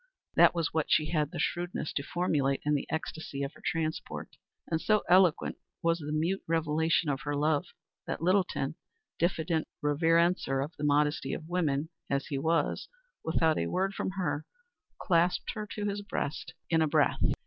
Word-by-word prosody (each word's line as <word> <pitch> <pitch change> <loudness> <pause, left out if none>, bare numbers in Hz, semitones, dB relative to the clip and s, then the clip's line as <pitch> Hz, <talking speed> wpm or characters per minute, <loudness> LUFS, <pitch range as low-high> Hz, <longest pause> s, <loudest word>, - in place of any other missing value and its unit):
That - - +6
was 165 -2 -1
what 160 -2 0
she 155 0 +3
had 150 -3 +1
the - - -7
shrewdness 175 -3 -2
to - - -1
formulate 140 -4 0
in 150 - +2
the 145 - 0
ecstasy 160 -3 -4
of 140 +2 -4
her - - -17
transport; 160 -2 -3 0.3
and 160 -1 -1
so 215 -1 +3
eloquent 180 -3 +4 0.3
was 165 0 +2
the 150 -1 -5
mute 165 +6 0
revelation 160 0 +1
of 135 -2 -1
her 145 0 -2
love 150 +3 +1 0.4
that - - -2
Littleton, 180 -5 +1 0.5
diffident 165 -2 +1 0.2
reverencer 165 -1 +3
of 160 - -13
the 150 - -7
modesty 150 +1 +2
of 155 - -8
woman 160 -4 0 0.2
as 140 0 0
he 140 -3 -3
was, 165 +3 0 0.4
without 160 0 +2
a 85 - 0
word 190 - 0
from - - -2
her 155 -5 -1 0.5
clasped 175 -1 +2
her 215 -1 -5
to 205 0 -4
his 205 0 -2
breast, 160 -5 -3
a - - -12
victor - - -45
in 165 -1 +4
a 160 - +3
breath. 145 - +2
160 Hz, 180 wpm, -30 LUFS, 150-175 Hz, 0.5 s, That